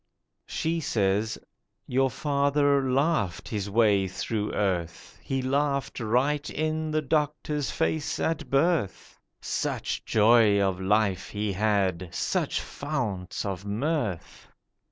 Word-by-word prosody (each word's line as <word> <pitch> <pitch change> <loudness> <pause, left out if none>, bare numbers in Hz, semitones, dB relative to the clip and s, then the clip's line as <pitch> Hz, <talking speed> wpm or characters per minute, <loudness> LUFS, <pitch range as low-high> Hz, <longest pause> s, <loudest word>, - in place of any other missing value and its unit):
She 165 +1 -1
says: 105 -5 0 0.5
'Your 135 +1 +2
father 140 -1 +1
laughed 135 - 0
his 105 -2 -3
way 100 -3 +3
through 105 +3 -3
earth: 90 -5 -2
He 135 -1 -2
laughed 140 0 0
right 130 +6 +1
in 155 0 -2
the 155 0 0
doctor's 150 0 -1
face 160 -2 -1
at 160 -1 -1
birth, 140 - 0 0.2
Such - - -2
joy 110 -1 +5
of 95 -2 0
life 100 -1 +1
he 105 0 -2
had, 95 -3 0
such - - -1
founts 110 -12 -4
of 95 -1 -4
mirth. 110 - -3
115 Hz, 115 wpm, -27 LUFS, 100-145 Hz, 0.5 s, joy